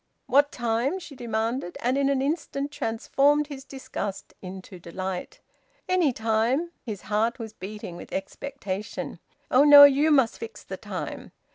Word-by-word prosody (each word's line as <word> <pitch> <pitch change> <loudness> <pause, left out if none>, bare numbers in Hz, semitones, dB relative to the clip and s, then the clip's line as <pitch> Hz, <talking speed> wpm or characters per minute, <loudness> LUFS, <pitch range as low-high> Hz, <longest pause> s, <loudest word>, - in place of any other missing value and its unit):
"What 285 +1 +4
time?" 240 +7 0
she 325 -6 -10
demanded, 225 -4 -2
and 250 +2 +1
in 275 0 +2
an 270 -1 +1
instant 285 -1 -2
transformed 285 +4 +1
his 280 -2 -8
disgust 260 -7 -6
into 185 0 -9
delight. 185 +2 -5 0.5
"Any 360 -6 +3
time." 230 +8 0
His 210 -5 -6
heart 220 +4 0
was 225 -3 -7
beating 195 -3 -8
with - - -11
expectation. 275 -8 -5 0.3
"Oh 260 +3 +6
no! 290 -1 +11
You 285 +2 +6
must 270 -7 +3
fix 460 +1 -8
the - - -6
time." - - -6
255 Hz, 145 wpm, -26 LUFS, 215-285 Hz, 0.5 s, no